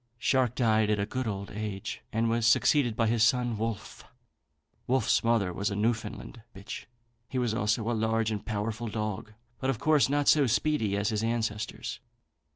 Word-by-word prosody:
Shark 125 0 +1
died 110 -3 +2
at 105 -1 +1
a 100 - 0
good 130 +3 -3
old 100 -1 -4
age, 105 -2 -5
and 115 +1 +1
was 115 0 +1
succeeded 120 0 +3
by 115 -1 +1
his 115 0 +1
son 120 +1 +3
Wolfe. 110 -1 -4 0.8
Wolfe's 130 -3 +2
mother 115 -6 +2
was 100 +3 -1
a 100 - -3
Newfoundland 115 +2 -2
bitch. 100 +1 -8 0.4
He 130 - -3
was 120 -3 0
also 110 -1 0
a 120 - +1
large 110 0 0
and 105 -2 -3
powerful 110 +1 -3
dog, 110 -1 -4 0.3
but 130 - -1
of 135 - 0
course 150 +2 +3
not 145 0 +1
so 145 -3 +5
speedy 115 -5 +1
as 105 +1 0
his 110 -1 -1
ancestors. 115 0 -3
115 Hz, 175 wpm, -29 LUFS, 105-120 Hz, 0.8 s, so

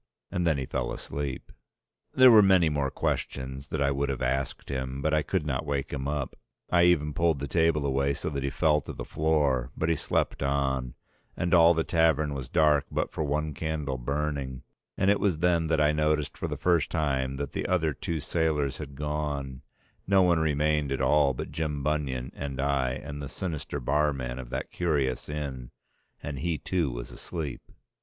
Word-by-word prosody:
And 90 -1 0
then 80 -3 +3
he 65 - -2
fell - - -2
asleep. 70 -2 -5 0.6
There 130 -1 +8
were 110 -2 +9
many 95 -5 +5
more 70 -2 0
questions 65 +1 -3
that 70 -1 -1
I 70 - +2
would 70 +1 -1
have 65 -1 -2
asked 65 +2 -2
him 65 0 -3
but 75 +2 0
I 75 - +4
could 80 +2 -1
not 65 -3 -1
wake 70 -2 -2
him 70 -1 -3
up. 70 -2 -3 0.4
I 85 -1 +5
even 75 -4 +3
pulled 85 -1 +2
the 70 +1 -4
table 80 0 +2
away 70 +1 +1
so - - -5
that 70 -2 -3
he 70 - -1
fell 75 +1 +2
to - - -8
the - - -6
floor, 75 -6 +1
but 80 - 0
he 85 - +3
slept - - -1
on, 65 -2 0 0.4
and 85 - 0
all 85 -1 +7
the 80 - +1
tavern 80 -3 +2
was 70 -2 -5
dark 75 -2 +3
but - - -2
for 80 - -2
one 75 +1 -1
candle 75 -4 -3
burning; 70 -1 -3 0.3
and 95 +1 +4
it 100 - +2
was 95 -6 +1
then 85 -1 +2
that 80 -1 +1
I 75 0 +4
noticed 75 -1 0
for - - -3
the - - -4
first 85 -3 +2
time 70 -5 0
that 70 +1 -4
the - - -3
other 80 -4 +1
two 80 +4 -3
sailors 75 -4 0
had 70 -3 -7
gone, 75 -2 -3 0.5
no 95 -1 +5
one 85 -2 +3
remained 75 -2 +1
at 70 - -1
all 75 -3 +3
but - - -5
Jim 75 -3 -2
Bunion 70 -4 -1
and 70 -2 -5
I 70 -2 +1
and 70 +2 -6
the 70 - -5
sinister 75 -4 -4
barman 70 -2 0
of 60 -2 -8
that - - -4
curious 70 -8 -1
inn, 70 -5 -5 0.5
and 75 -2 -4
he 85 +1 -1
too 85 0 -1
was - - -6
asleep. 80 -7 -5
75 Hz, 195 wpm, -28 LUFS, 70-80 Hz, 0.6 s, were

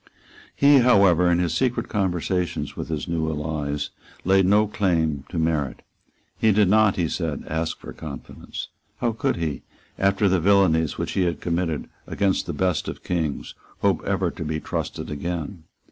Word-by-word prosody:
He 140 0 +6
however, 100 -8 +5
in 85 - +3
his 85 -2 0
secret 120 +8 0
conversations 90 -3 -1
with - - -5
his 80 -2 -3
new 80 -2 -1
allies, 75 -1 -3 0.3
laid 95 0 +4
no 105 +2 +5
claim 80 -9 0
to 90 - -5
merit. 80 -4 -1 0.6
He 110 - +4
did 100 -2 +4
not, 110 -1 +4
he 85 -3 0
said, 80 -3 -3
ask 80 +1 -2
for - - -10
confidence. 75 -4 -8 0.3
How 120 - 0
could 130 +4 -1
he, 80 -4 -3 0.4
after 100 +1 +3
the 95 -1 +3
villanies 85 -4 +3
which - - -3
he - - 0
had 85 -1 -1
committed 85 -2 -2 0.2
against 100 -2 0
the - - -2
best 90 -4 0
of - - -6
Kings, 80 -5 -2 0.3
hope - - +2
ever - - 0
to - - -6
be 80 0 -2
trusted - - -4
again? 85 +2 -4
85 Hz, 165 wpm, -24 LUFS, 80-100 Hz, 0.6 s, He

